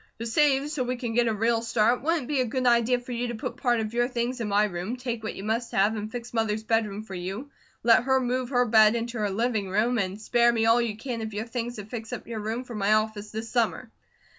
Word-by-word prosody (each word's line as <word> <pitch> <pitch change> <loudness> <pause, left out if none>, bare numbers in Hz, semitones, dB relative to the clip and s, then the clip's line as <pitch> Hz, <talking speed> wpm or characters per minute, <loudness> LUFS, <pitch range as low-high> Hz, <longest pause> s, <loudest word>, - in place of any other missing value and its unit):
To 230 - -5
save 280 +3 +2
so 295 - -2
we 250 +1 -2
can 240 -2 -4
get 240 0 +3
a 225 - +1
real 225 +2 +1
start, 230 +1 +2
wouldn't 325 0 0
it - - -9
be 290 -3 +1
a - - +1
good 255 +2 -2
idea 240 0 +4
for 245 +1 -10
you 245 0 -2
to 240 - -4
put 240 +3 -5
part 245 -4 +1
of 220 0 -3
your 240 0 +2
things 245 0 -2
in 225 - -2
my 205 +1 +3
room, 190 +3 -3
take 245 -2 -4
what 220 - -5
you 195 - -7
must 230 +3 -1
have, 205 +3 +3
and 215 0 -5
fix 240 0 -7
Mother's 220 -1 0
bedroom 215 -2 0
for 195 - -10
you, 195 +10 -5 0.3
let 230 +1 +5
her 265 0 +3
move 250 0 -1
her 245 -2 +3
bed 220 -1 +5
into 235 0 -3
her 210 -1 0
living 215 -1 -1
room, 225 +5 +1
and 190 +1 -2
spare 240 +2 +3
me 225 -1 +1
all 230 +2 +5
you 220 -3 -2
can 235 0 -4
of 220 -1 -5
your 215 +2 -2
things 240 0 -4
to 210 - -7
fix 225 +1 -7
up 245 - -5
your 230 -2 -5
room 220 +4 -3
for 250 - -10
my 210 -1 +2
office 215 -1 0
this 220 +1 -5
summer. 225 -1 -1
230 Hz, 270 wpm, -26 LUFS, 215-245 Hz, 0.3 s, let